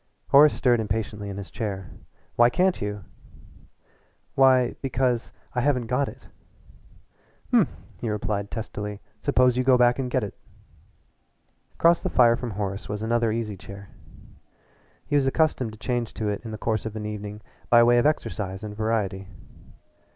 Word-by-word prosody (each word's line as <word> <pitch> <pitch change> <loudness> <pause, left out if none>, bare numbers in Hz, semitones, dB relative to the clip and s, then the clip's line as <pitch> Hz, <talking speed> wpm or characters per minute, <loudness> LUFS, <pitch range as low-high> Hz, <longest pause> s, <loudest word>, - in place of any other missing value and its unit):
Horace 145 +2 +7
stirred 120 -3 +3
impatiently 105 -1 -3
in 100 - -6
his 95 -4 -8
chair. 100 -7 -5 0.4
"Why 120 0 +6
can't 185 +7 +1
you?" 105 -1 -4 1.3
"Why, 130 -2 +4
because 130 -3 0 0.2
I 125 - 0
haven't 130 -3 +1
got 125 +4 0
it." - - -14 1.2
"Hm!" - - +5 0.3
he 115 - -3
replied 105 -1 -2
testily. 105 -2 -5 0.2
"Suppose 125 -3 +3
you 130 - +2
go 130 0 +5
back 120 +1 +4
and 130 -2 -2
get - - 0
it." - - -6 1.4
Across 170 0 +4
the - - -2
fire 120 -2 +5
from 125 0 -5
Horace 100 -1 -4
was 105 +1 -4
another 115 0 +1
easychair. 100 -3 -6 1.2
He - - -1
was 140 -2 +3
accustomed 135 -6 +1
to - - -12
change 120 +1 -3
to 110 -2 -2
it 100 - -3
in 115 - -7
the 110 - -5
course 110 0 -1
of 110 - -7
an 105 -1 -5
evening 105 0 -6 0.3
by 120 0 +7
way 120 +1 +5
of 120 - +3
exercise 105 -9 -2
and 105 -1 -6
variety. 105 -3 -1
115 Hz, 160 wpm, -25 LUFS, 105-125 Hz, 1.4 s, Horace